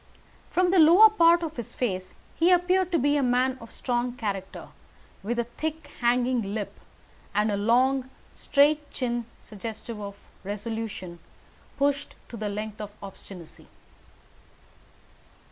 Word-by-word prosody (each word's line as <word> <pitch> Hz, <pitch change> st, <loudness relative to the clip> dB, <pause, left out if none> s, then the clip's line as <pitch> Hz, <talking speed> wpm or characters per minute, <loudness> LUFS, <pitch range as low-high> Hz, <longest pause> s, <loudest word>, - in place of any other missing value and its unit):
From 360 Hz, 0 st, +2 dB
the 375 Hz, -, +4 dB
lower 355 Hz, +8 st, +8 dB
part 340 Hz, -4 st, +5 dB
of 320 Hz, -2 st, -3 dB
the 245 Hz, -, -4 dB
face 190 Hz, -5 st, -4 dB, 0.2 s
he 335 Hz, +2 st, +3 dB
appeared 365 Hz, +1 st, +3 dB
to 340 Hz, -, +3 dB
be 290 Hz, +1 st, +2 dB
a -, -, +2 dB
man 255 Hz, +1 st, +1 dB
of 230 Hz, -, -11 dB
strong 245 Hz, -1 st, -2 dB
character, 200 Hz, -5 st, -5 dB, 0.5 s
with 235 Hz, +5 st, -3 dB
a 235 Hz, -, +2 dB
thick, 315 Hz, +7 st, -6 dB
hanging 240 Hz, -3 st, +1 dB
lip, 210 Hz, -2 st, -5 dB, 0.6 s
and 210 Hz, +1 st, +2 dB
a -, -, +1 dB
long, 250 Hz, +5 st, +2 dB, 0.2 s
straight 290 Hz, +1 st, +2 dB
chin, 240 Hz, -2 st, -2 dB, 0.2 s
suggestive 220 Hz, +1 st, -7 dB
of 200 Hz, -1 st, -7 dB, 0.3 s
resolution 205 Hz, -3 st, -5 dB, 0.6 s
pushed 285 Hz, 0 st, 0 dB
to -, -, -8 dB
the 210 Hz, -1 st, -3 dB
length 210 Hz, +1 st, -5 dB
of 210 Hz, -, -5 dB
obstinacy. 190 Hz, -3 st, -11 dB
240 Hz, 135 wpm, -26 LUFS, 210-290 Hz, 0.6 s, lower